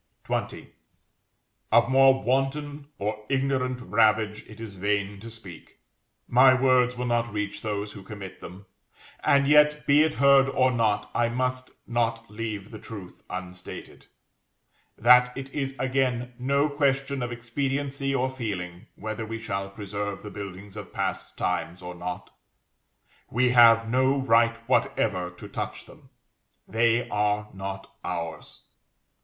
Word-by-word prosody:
XX. - - -3 1.0
Of 115 0 +5
more 135 +1 +5
wanton 140 +3 -1
or 105 +1 -3
ignorant 130 -2 0
ravage 105 0 +2
it 105 - -13
is 110 -3 -7
vain 100 +1 -1
to 115 +3 -9
speak; 100 -8 -12 0.5
my 130 +1 +6
words 125 -1 +3
will 125 - -2
not 120 -1 0
reach 105 0 -3
those 105 -1 -3
who 100 - -10
commit 95 -1 -9
them, 95 +3 -10 0.6
and 140 0 +4
yet, 150 0 +5
be 145 +1 +5
it 155 0 +2
heard 140 0 +5
or 130 -1 +3
not, 105 -4 0
I 120 0 +2
must 130 +1 -2 0.2
not 115 -1 -1
leave 105 -2 -5
the 110 - -8
truth 100 -5 -10
unstated, 90 -1 -8 0.9
that 125 +2 +5
it 135 0 -7
is 135 -2 -3
again 130 -2 0
no 140 +3 +2
question 140 -2 0
of 120 0 -3
expediency 135 +3 -2
or 130 0 +1
feeling 95 -8 -5
whether 110 +2 -5
we 115 +1 -5
shall 100 -3 -4
preserve 100 0 -5
the 105 - -7
buildings 100 0 -8
of 105 -2 -8
past - - -3
times 90 - -2
or 90 0 -6
not. 90 +1 -6 1.0
We 125 +1 +2
have 115 -2 +7
no 130 +3 +2
right 115 -3 +3
whatever 95 -7 +1
to 90 - -11
touch - - -5
them. - - -17 0.6
They 115 +1 +2
are 105 0 0
not 95 0 -7
ours. 85 -1 -5
115 Hz, 140 wpm, -26 LUFS, 105-130 Hz, 1.0 s, have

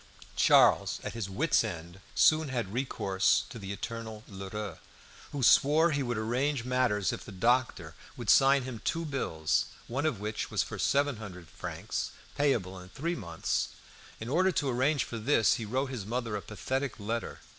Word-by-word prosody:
Charles, - - +5
at - - -4
his 115 -4 -4
wit's 135 +11 +2
end, 85 -3 -6 0.2
soon 155 -1 +4
had 115 -7 -3
recourse 95 -7 +1
to 115 - -8
the 100 -1 -6
eternal 110 +1 -6
Lheureux, 100 -1 -6 0.5
who 140 -2 -3
swore 155 +7 +5
he 140 -1 0
would 120 -3 -2
arrange 125 +4 0
matters 125 -6 +1
if - - -6
the - - -10
doctor 95 -5 +1 0.2
would 120 -3 -7
sign 135 +2 +6
him 125 -4 -6
two 165 0 -1
bills, 80 - 0 0.2
one 135 +6 -1
of 125 -10 -1
which 105 +1 -3
was - - +1
for - - -7
seven 140 -2 +2
hundred 90 -6 -9
francs, - - -4 0.3
payable 110 -11 0
in 90 0 -12
three 165 - -3
months. 85 -7 -2 0.5
In 110 - -6
order 185 +8 +3
to 145 -5 0
arrange 130 +3 +2
for 115 - -6
this 115 -1 +3
he - - -3
wrote 130 +5 -1
his 120 -6 -4
mother 115 +1 -3
a 100 - -3
pathetic 130 +5 -3
letter. 115 +3 -4
115 Hz, 175 wpm, -30 LUFS, 100-135 Hz, 0.5 s, sign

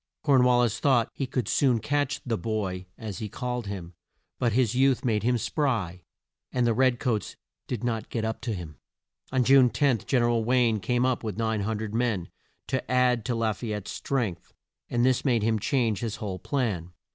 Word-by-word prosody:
Corn 135 -4 +5
wal 125 -1 +4
lis 115 -2 0
thought 125 -5 +2
he 135 - -3
could 125 -1 -2
soon 130 -4 +3
catch 145 +3 -1
"the 120 -3 0
boy" 100 -5 -3
as 105 -4 -6
he 110 - -4
called 125 -1 -4
him 90 -3 -6 0.5
but 120 -3 +1
his 125 -2 +2
youth 130 0 +2
made 110 -4 +1
him 120 +3 +2
spry, 110 - -1 0.5
and 125 -1 +1
the 115 - +3
red 130 0 +2
coats 110 - -1 0.3
did 110 - -4
not 115 -3 -2
get 115 -2 -2
up 110 0 -3
to 115 -4 -2
him. 80 -6 -8 0.5
On 130 -1 +2
June 130 0 +6
10, 120 +1 +2
Gen 125 -3 +3
er - - +3
al 115 -1 +1
Wayne 120 -2 +2
came 120 +6 +1
up 130 -2 0
with 105 -3 -4
900 110 -1 -1
men, 110 -7 -1 0.3
to 130 - -3
add 125 -2 +3
to 125 - -1
La 115 -1 +1
fay 110 +2 -5
ette's 105 -1 -5
strength, 95 -10 -3 0.4
and 120 0 +2
this 130 -1 +2
made 120 -6 +2
him 110 0 +1
change 115 -3 +1
his 115 -2 -3
whole 95 -3 -5
plan. 100 - -2
115 Hz, 200 wpm, -27 LUFS, 105-125 Hz, 0.5 s, June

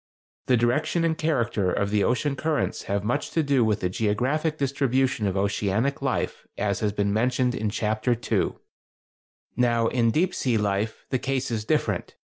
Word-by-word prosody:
The 125 - +4
direction 155 +8 +1
and 165 -1 +2
character 120 - 0
of 100 +2 -1
the 105 -1 +2
ocean 135 +3 +1
currents 155 0 -1
have 100 0 -1
much 115 +4 -1
to 165 - +1
do 140 -4 +3
with 105 -1 +1
the 90 - 0
geographic 130 - 0
distribution 135 -5 +1
of 95 0 -1
oceanic 100 +6 0
life, - - -2
as 100 -2 0
has 105 -1 0
been 100 0 0
mentioned 125 +3 +1
in 110 -3 -1
Chapter 110 +3 0
II - - 0
(page 115 - -16
25). - - +2 1.0
Now 120 -2 +2
in 120 -2 +2
deep 175 +9 +1
sea 125 -4 0
life 105 +1 -1
the 130 - +1
case 135 -1 -2
is 110 -2 -2
different. - - -1
120 Hz, 180 wpm, -25 LUFS, 105-135 Hz, 1.0 s, The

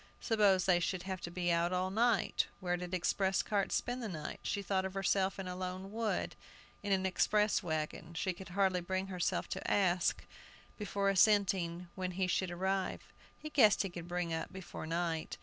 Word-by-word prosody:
Suppose 200 -5 +3
they 180 -2 +4
should 180 +1 -2
have 190 -1 -4
to - - -5
be 175 0 -1
out 170 +1 +2
all 185 +1 0
night? 225 -1 +2
Where 180 -2 0
did 180 0 -6
express 190 +1 +1
carts 200 -2 0
spend 245 +1 -2
the 230 - -3
night? 155 -5 -5
She 200 - -2
thought 190 -1 0
of 190 0 -5
herself 195 0 +1
in 195 -1 -5
a 180 - -4
lone 185 +1 -5
wood, 225 0 -1 0.5
in 205 - -3
an 190 -1 +2
express 210 +3 +2
wagon! 160 0 -3
She 185 +3 -1
could 180 0 -10
hardly 190 -1 +2
bring 190 +2 -2
herself 180 -1 -1
to - - -3
ask, 180 -3 +2 0.5
before 200 -1 0
assenting, 190 -3 +3
when 185 -1 -3
he 185 +1 0
should 185 +1 0
arrive. 190 +2 -2 0.2
"He 305 - -8
guessed 220 -10 +5
he 195 - -4
could 175 -1 -7
bring 175 -1 -2
up 160 - -3
before 190 -4 -7
night." 165 -1 -2
185 Hz, 190 wpm, -34 LUFS, 175-195 Hz, 0.5 s, guessed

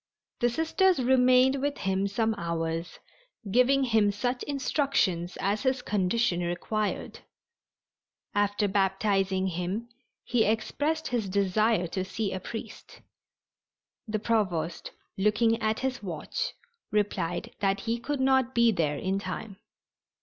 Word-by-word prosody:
The 240 - +3
Sisters 325 +7 +2
remained 255 +1 +4
with 285 0 -1
him 190 +1 0
some 220 +3 0
hours, 165 -1 -3 0.5
giving 260 +4 +4
him 220 -5 +3
such 245 +5 -2
instructions 270 - 0
as 200 +2 0
his 260 -1 0
condition 205 0 +1
required. 200 +5 -2 1.1
After 205 0 +1
baptizing 195 -1 +1
him 190 +6 -3 0.3
he 240 -2 +2
expressed 290 +9 -1
his 230 -5 -1
desire 200 +1 +2
to 185 +2 -2
see 195 +1 -3
a 190 - -3
priest. 225 +4 -8 1.1
The 215 0 -1
Provost, 185 -7 -1 0.3
looking 225 +3 +2
at 220 0 0
his 265 0 -2
watch, 175 -7 -4 0.4
replied 190 -5 -1
that 195 0 +1
he 235 +1 -1
could 285 +3 -3
not 265 -1 +2
be 235 -1 +5
there 155 -7 0
in 190 +5 -1
time. 195 +1 -6
210 Hz, 120 wpm, -28 LUFS, 190-245 Hz, 1.1 s, be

